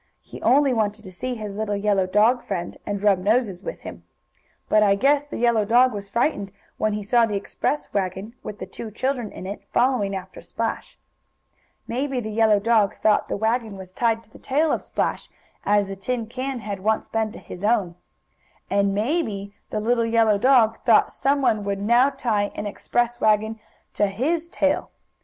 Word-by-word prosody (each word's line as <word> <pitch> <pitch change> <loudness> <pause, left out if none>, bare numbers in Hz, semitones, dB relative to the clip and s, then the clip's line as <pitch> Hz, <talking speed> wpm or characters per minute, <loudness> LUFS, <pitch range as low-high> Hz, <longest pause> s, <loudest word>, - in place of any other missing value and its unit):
He - - -11
only 275 0 +4
wanted 215 -1 -1
to 190 - -10
see 250 +8 -4
his 210 -3 -6
little 205 0 -2
yellow 200 -2 +1
dog 220 +6 +3
friend 175 -3 -3
again, - - -20
and 205 -1 -3
rub 200 -3 +4
noses 205 -1 +1
with - - -7
him. - - -9 0.6
But 215 - +4
I 200 -1 +4
guess 280 +7 +3
the 290 - -8
yellow 235 -2 +3
dog 245 +4 +4
was 200 -1 -6
frightened 200 -3 0 0.3
when 215 -1 +1
he 210 0 -3
saw 230 +3 +3
the 210 - -3
express 200 +8 -3
wagon, 195 +2 -2
with 210 - -7
the - - -6
two 230 - -8
children 245 0 -2
in - - -9
it, 200 +2 -6
following 240 -6 +1
after 190 - -8
Splash. - - -4 0.9
Maybe 260 +2 -2
the 220 -2 -5
yellow 215 -1 +4
dog 215 -2 +2
thought 215 -1 +2
the - - -2
wagon 220 -1 -1
was 185 -1 -10
tied 225 +2 0
to 220 - -25
the - - -15
tail 300 +4 +1
of - - 0
Splash, - - -2 0.4
as 205 0 +3
the 195 0 -6
tin 230 +4 -3
can 255 +2 -4
had 205 -2 -5
once 215 +3 0
been 220 -1 -1
to - - -9
his 180 - -10
own. 205 -5 +2 0.8
And 200 0 +2
maybe 210 - -1 0.2
the 215 - -2
little 230 +2 +1
yellow 225 -2 +3
dog 230 -2 +4
thought 230 -3 +4
some 275 0 0
one 215 -5 +2
would 200 -1 -2
now 240 +6 +4
tie 225 -7 -1
an 210 - -4
express 240 +3 -1
wagon 220 +1 +2 0.3
to 205 - +2
his 315 +12 -1
tail. 290 -4 0
220 Hz, 195 wpm, -23 LUFS, 200-245 Hz, 0.9 s, only